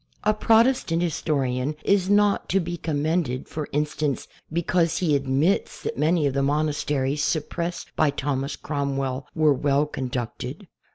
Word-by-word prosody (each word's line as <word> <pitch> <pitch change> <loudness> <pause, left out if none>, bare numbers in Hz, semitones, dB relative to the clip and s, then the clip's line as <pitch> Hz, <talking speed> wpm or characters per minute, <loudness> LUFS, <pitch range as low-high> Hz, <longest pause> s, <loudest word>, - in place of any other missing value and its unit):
A 215 - +3
Protestant 220 -5 +3
historian 140 -4 -1
is 195 -2 +3
not 205 0 +3
to 195 - +3
be 175 -1 -3
commended, 155 -4 -1
for 155 -2 -5
instance, 150 -1 -1 0.2
because 170 0 +1
he 160 -5 +2
admits 140 +7 0
that - - -3
many 155 +2 +2
of 140 - +1
the 140 - +1
monasteries 145 -1 0
.suppressed 170 +3 -2
by 155 - +3
Thomas 140 0 -2
Cromwell 135 -2 -2
were 155 -2 +4
well 140 +2 +2
conducted. 125 -5 -5
150 Hz, 135 wpm, -24 LUFS, 140-170 Hz, 0.2 s, were